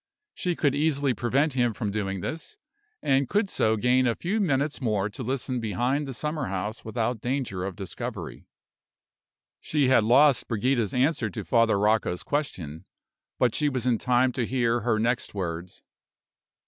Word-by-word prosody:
She 180 -1 -2
could 145 -4 +1
easily 145 -2 +1
prevent 135 +6 +1
him 120 -3 +1
from 105 -4 -2
doing 100 -2 -2
this, 165 - -5 0.5
and 135 -1 +2
could 205 +1 +2
so 110 -11 +1
gain 125 +3 +3
a 115 - +1
few 195 +6 -1
minutes 145 -6 0
more 105 -4 0
to 115 - -8
listen 130 0 -2
behind 125 +6 -1
the 135 - -5
summer 150 +1 -3
house 100 +3 -4
without 115 0 -2
danger 120 -8 -2
of 95 -1 -4
discovery. 95 -1 -6 1.1
She 145 -4 +1
had 130 -4 +5
lost 130 +4 +5
Brigida's 120 -1 0
answer 130 -3 +2
to 90 - -6
Father 115 -4 +3
Rocco's 105 -3 +1
question; 90 - -3 0.5
but 120 -3 +2
she 150 -1 +1
was 130 -3 -2
in 120 -3 +2
time 125 +1 +2
to 120 -2 -2
hear 120 -2 +1
her 115 -1 +1
next 120 0 -1
words. 85 -2 -5
125 Hz, 160 wpm, -26 LUFS, 110-140 Hz, 1.1 s, had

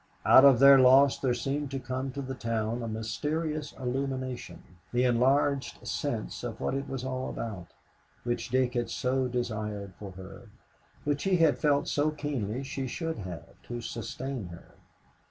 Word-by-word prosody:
Out 130 - +8
of 135 -3 +8
their 140 +2 +8
loss 130 +2 +6
there 125 -3 +1
seemed 140 +2 -2
to 135 0 -3
come 130 +1 -4
to 140 0 -4
the 130 0 -5
town 115 -1 -2
a 115 - -4
mysterious 150 +8 -3
illumination, 130 -1 -4 0.3
the 125 +1 +2
enlarged 135 +3 +2
sense - - -3
of - - -5
what - - -1
it 135 0 -3
was 130 -1 -4
all 130 0 -3
about, 100 -7 -5 0.6
which 120 0 -2
Dick 130 0 +1
had 120 -2 -1
so 130 0 0
desired 105 -5 -3
for 100 - -7
her, 95 +4 -11 0.6
which 145 -1 0
he 190 -1 +3
had 165 -2 +3
felt 145 -2 +2
so 145 +1 +1
keenly 135 -6 -3
she 135 0 -4
should 160 +3 -4
have, 90 -4 -7 0.2
to 120 0 -6
sustain 120 0 -5
her. 85 -1 -12
130 Hz, 165 wpm, -29 LUFS, 115-140 Hz, 0.6 s, Out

